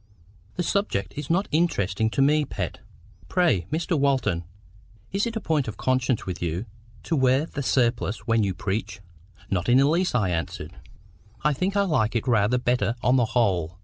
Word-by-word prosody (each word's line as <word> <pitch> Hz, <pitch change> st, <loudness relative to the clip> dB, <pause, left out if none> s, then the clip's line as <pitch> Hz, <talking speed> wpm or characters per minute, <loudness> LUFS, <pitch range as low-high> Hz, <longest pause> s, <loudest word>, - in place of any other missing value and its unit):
"The 180 Hz, -, -1 dB
subject 200 Hz, -, -1 dB
is 145 Hz, -1 st, -6 dB
not 185 Hz, +4 st, +1 dB
interesting 110 Hz, -, +1 dB
to 135 Hz, -, +1 dB
me, 150 Hz, +2 st, +3 dB
Pet. 100 Hz, -, -4 dB, 0.5 s
Pray, 130 Hz, -, +2 dB
Mr. 165 Hz, +2 st, 0 dB
Walton, 130 Hz, -11 st, +1 dB, 0.7 s
is 200 Hz, +4 st, 0 dB
it 230 Hz, -, -5 dB
a -, -, 0 dB
point 155 Hz, -, 0 dB
of 110 Hz, -, -6 dB
conscience 130 Hz, -2 st, 0 dB
with 90 Hz, -2 st, -5 dB
you 85 Hz, +5 st, -2 dB, 0.4 s
to 165 Hz, -, -1 dB
wear 130 Hz, +1 st, +3 dB
the 145 Hz, -, -5 dB
surplice 120 Hz, -5 st, 0 dB
when 115 Hz, -1 st, +2 dB
you 95 Hz, -2 st, -1 dB
preach?" 100 Hz, +1 st, -3 dB, 0.5 s
"Not 90 Hz, 0 st, 0 dB
in 125 Hz, -, +6 dB
the 135 Hz, +1 st, +5 dB
least," 170 Hz, 0 st, +1 dB
I 100 Hz, -7 st, +2 dB
answered. 80 Hz, -2 st, -4 dB, 0.7 s
"I 150 Hz, +1 st, +3 dB
think 185 Hz, +8 st, -1 dB
I 200 Hz, -, +4 dB
like 120 Hz, -, +1 dB
it 115 Hz, +3 st, -1 dB
rather 115 Hz, 0 st, +3 dB
better 120 Hz, -3 st, 0 dB
on 125 Hz, +2 st, +4 dB
the 120 Hz, -, +3 dB
whole. 90 Hz, -7 st, +1 dB
125 Hz, 180 wpm, -25 LUFS, 100-150 Hz, 0.7 s, in